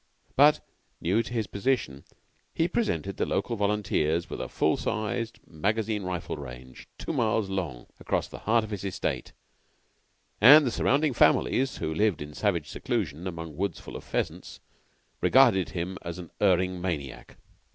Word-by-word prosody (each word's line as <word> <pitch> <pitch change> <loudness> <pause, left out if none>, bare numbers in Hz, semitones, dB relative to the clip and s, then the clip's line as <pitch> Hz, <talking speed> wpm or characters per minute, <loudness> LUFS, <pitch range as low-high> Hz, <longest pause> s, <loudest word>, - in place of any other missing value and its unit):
But, 145 +2 +6 0.4
new 95 +7 +2
to 115 - -8
his 115 -3 -1
position, 100 - -1 0.5
he 165 - +2
presented 100 - -1
the - - +1
local 115 +4 -1
volunteers 100 -6 0
with - - -4
a - - -5
full - - +2
sized 115 +1 -2
magazine 105 +6 -1
rifle 90 -4 -4
range, 65 -2 -10
two - - -4
miles 110 -3 +1
long, 80 -11 -3
across - - -1
the - - -10
heart 115 +1 +2
of 110 - -8
his 100 -2 -4
estate, 95 -2 -3 1.1
and 145 +7 +9
the 125 - 0
surrounding 140 +4 +2
families, 130 +2 +3
who 80 - -2
lived 105 +1 +1
in 75 0 -7
savage 85 -5 0
seclusion 95 - -3
among 85 -3 -6
woods 95 0 -2
full - - -10
of - - -7
pheasants, - - -4 0.6
regarded 115 -10 +5
him 90 +2 -4
as 85 0 -6
an 90 -3 -9
erring 90 -2 +2
maniac. 75 -7 -5
95 Hz, 155 wpm, -27 LUFS, 85-115 Hz, 1.1 s, and